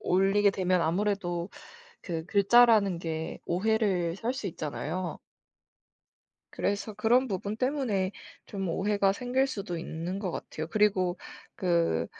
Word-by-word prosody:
올리게 195 +2 +3
되면 185 -2 +1
아무래도 175 0 -1 0.5
그 165 -3 -3
글자라는 205 -1 +5
게 160 -1 -4
오해를 185 -3 +1
살 230 +5 -2
수 260 -6 -4
있잖아요. 165 +2 -4 1.3
그래서 205 +2 -2
그런 245 +5 +3
부분 200 +1 -3
때문에 235 -7 0 0.3
좀 195 -2 -4
오해가 195 +3 +1
생길 250 +5 0
수도 200 -9 -4
있는 170 +3 -4
거 195 -3 -3
같아요. 155 -1 -5
그리고 190 -3 +2 0.4
그 170 - +1
195 Hz, 255 characters per minute, -29 LUFS, 175-210 Hz, 1.3 s, 글자라는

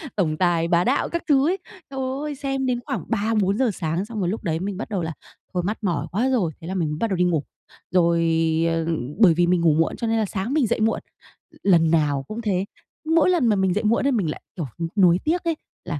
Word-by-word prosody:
tổng 155 -6 0
tài 170 -2 +2
bá 170 0 +3
đạo 260 +7 +1
các 340 - -3
thứ 280 -2 +4
ấy. 380 - 0 0.3
Trời 270 - -6 0.2
ơi, 300 -1 -4
xem 270 -1 -2
đến 245 -2 0
khoảng - - -3
3:00-4:00 215 +2 +1
sáng 170 +2 -2
xong 220 0 -6
rồi 180 -3 0
lúc 215 +2 -4
đấy 160 -3 -1
mình 195 0 -4
bắt 225 - -5
đầu 195 -4 -2
là 160 0 -3 0.4
"Thôi 180 - -1
mắt 210 +5 -2
mỏi 165 -6 -1
quá 240 +8 +1
rồi," 200 -11 +1
thế 165 - -8
là 190 - -3
mình 165 -5 0
m 150 - -3
bắt 230 - +1
đầu 190 - -1
đi 180 - +3
ngủ. 165 -5 +1 0.5
Rồi, 170 -2 +3 0.5
ờ, 165 -1 -1 0.3
bởi 195 -7 +7
vì 175 +1 +2
mình 180 -1 +2
ngủ 165 -3 +4
muộn 165 +1 +1
cho 230 - -3
nên 225 0 +1
là 220 - +1
sáng 200 +6 -3
mình 285 -7 +2
dậy - - 0
muộn, 225 - +2 0.6
l - - 0
lần 165 -2 +4
nào 145 -4 +2
cũng 220 +2 -5
thế. 195 -4 0 0.5
Mỗi 330 +2 +5
lần 340 -9 +3
mà 215 - +3
mình 190 -2 +1
dậy 210 - -1
muộn 225 +4 +2
ấy - - +3
mình 200 - 0
lại, - - -5
kiểu, 165 -5 -3 0.2
n 165 - 0
nuối 175 -1 +5
tiếc 335 +3 0
ấy, 335 -1 0 0.3
là, 150 -4 -3
190 Hz, 260 wpm, -23 LUFS, 170-230 Hz, 0.6 s, bởi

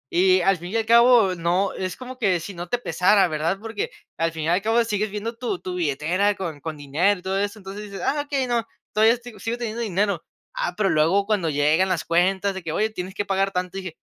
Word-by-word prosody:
Y 185 +1 +5
al 195 +1 +3
fin 175 +2 -8
y - - -4
al 225 -1 +1
cabo, 235 -4 +6
no, 175 +3 0
es 185 -1 -4
como 255 0 -9
que 190 -6 +2
si 195 +5 -7
no 175 0 -7
te 245 - +1
pesara, 200 -4 +3
¿verdad?, 160 +4 -1
porque 225 - -4 0.3
al 165 0 +1
fin 160 -1 -5
y 155 - -2
al 180 +3 +2
cabo, 225 +2 +2
sigues 210 -1 -1
viendo 215 +3 -4
tu 225 -7 -2
tu 185 - -5
billetera 175 +5 +1
con 165 -6 -5
con 155 0 -5
dinero 165 +8 +1
y - - -18
todo 190 +1 -1
eso. 205 +2 -2
Entonces 200 +2 -8
dices: 200 -1 -8
"Ah, 290 +1 +1
okey, 275 -3 -1
no. 235 -2 0 0.3
Todavía 220 +2 +5
estoy 240 -3 -12
sigo 230 +5 -3
teniendo 235 -1 -4
dinero". 200 -4 0 0.3
Ah, 175 - -2
pero 205 -2 +2
luego 165 +6 +3
cuando 200 -6 0
llegan 150 +6 +2
las 175 -3 0
cuentas 190 +4 +2
de 190 - -6
que: 165 -2 -5
"Oye, 215 +1 +1
tienes 185 -2 -6
que 205 - -2
pagar 195 0 +1
tanto 180 0 -3
y - - -5
dije 175 -4 -8
195 Hz, 245 wpm, -23 LUFS, 175-215 Hz, 0.3 s, cabo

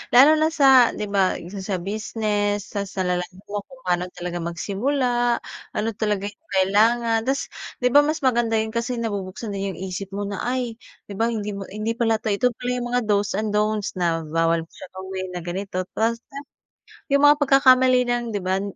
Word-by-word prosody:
Lalo 300 +5 +8
na 315 - +4
sa 270 -6 +5
'di 210 -1 -4
ba, 195 -2 +2
isa 190 +4 -7
sa 190 0 -2
business 205 0 -2
tas 200 -2 -4
nalalaman 180 +1 -2
mo 205 - -1
kung 265 -1 -16
paano 180 0 0
talaga 175 0 -4
magsimula, 240 - 0 0.4
ano 215 +1 0
talaga 210 -2 0
'yung 315 +10 -30
kailangan 225 +4 +3
tas 275 +1 -1 0.3
'di 250 - +3
ba 285 - +8
mas 310 -2 -2
maganda 240 -3 +2
'yun 220 0 0
kasi 235 +2 -2
nabubuksan 205 -1 -4
din 195 -1 -3
'yung - - -11
isip 190 +1 -5
mo 205 - -2
na 200 -1 -4
ay 245 -2 -2 0.3
'di - - -4
ba 225 - +3
hindi 210 -3 -2
mo 200 -1 -6
hindi 215 +3 -3
pala 225 -2 +3
ito 215 - 0
ito 200 +5 +2
pala 245 - -4
'yung 245 -1 -2
mga 245 +1 +1
do's 205 -2 +1
and 215 0 -1
don'ts 210 -2 0
na 165 -2 0
bawal 165 +1 +1
siya - - -11
gawin 190 0 -5
na 175 - -5
ganito 185 +1 -3
tapos 230 +1 -1 0.9
'yung 280 +1 +4
mga 290 0 +8
pagkakamali 260 -2 +5
ng 240 0 -1
'di 205 - -2
ba 190 +1 +1
210 Hz, 190 wpm, -23 LUFS, 190-240 Hz, 0.9 s, Lalo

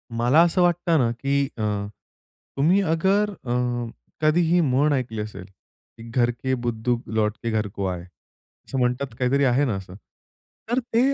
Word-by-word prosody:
मला 120 +7 +4
असं 175 +2 +2
वाटतं 175 -1 +2
ना, 120 -3 +2
की 140 +4 0
अ, 110 - -3 0.9
तुम्ही 170 +8 +4
अगर 190 +4 +2
अ, 125 -11 -5 0.7
कधीही 165 +3 +3
म्हण 145 0 +2
ऐकली 120 -5 -2
असेल, 100 -3 -7
की 100 +4 -20
घर 120 0 +2
के 130 +2 -3
बुद्धू 120 +1 0
लौट 110 0 0
के 115 - -1
घर 110 -1 0
को 100 0 -5
आए 90 -2 -3 0.7
असं 135 - -4
म्हणतात, 125 +1 0
काहीतरी 135 +2 +2
आहे 130 +3 +3
ना 115 -7 -1
असं. 95 -1 -8 0.7
तर 240 +2 +2
ते 230 -2 -1
130 Hz, 160 wpm, -24 LUFS, 115-160 Hz, 0.9 s, मला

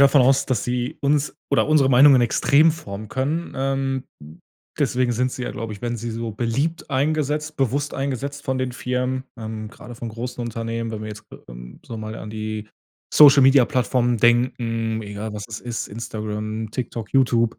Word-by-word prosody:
davon 140 0 +6
aus, 135 +1 +3
dass 125 -6 0
sie 125 +5 -2
uns 145 +1 +1
oder - - +3
unsere 150 -3 +4
Meinungen 135 +1 +7
extrem 145 +6 +4
formen 105 -9 -8
können, 145 +8 -2
ähm, 135 0 -1 0.2
hm, 75 +2 -13 0.4
deswegen 125 -1 +1
sind 125 +2 0
sie 125 - -5
ja, - - -3
glaube 115 -1 -5
ich 100 - -10
werden 120 0 -2
sie 120 +1 -5
so 115 0 -4
beliebt 135 - -2
eingesetzt 150 +2 0
bewusst 140 +2 0
eingesetzt 140 +1 -3
von 130 -1 -1
den 130 -1 -2
Firmen, 125 +1 -2
ähm, 110 -1 -6
grade 120 +1 -11
von 115 0 -5
großen 120 +2 -5
Unternehmen, 115 0 -3
wenn 105 - -5
wir 110 - -5
jetzt, 105 -1 -10
ge - - -13
ähm, - - -11
so 115 - -7
mal 110 0 -6
an 105 - -8
die 110 0 -5 0.5
Social-Media-Plattformen 130 -3 +6
denken, 115 -1 +1
egal 105 +1 -6
was 105 -1 -6
es 110 -1 -6
ist, 120 -2 -4
Instagram, 110 0 -5
Tiktok, 120 -3 -5
YouTube. 120 -4 +3
Äh, - - -33
120 Hz, 180 wpm, -22 LUFS, 110-135 Hz, 0.5 s, Meinungen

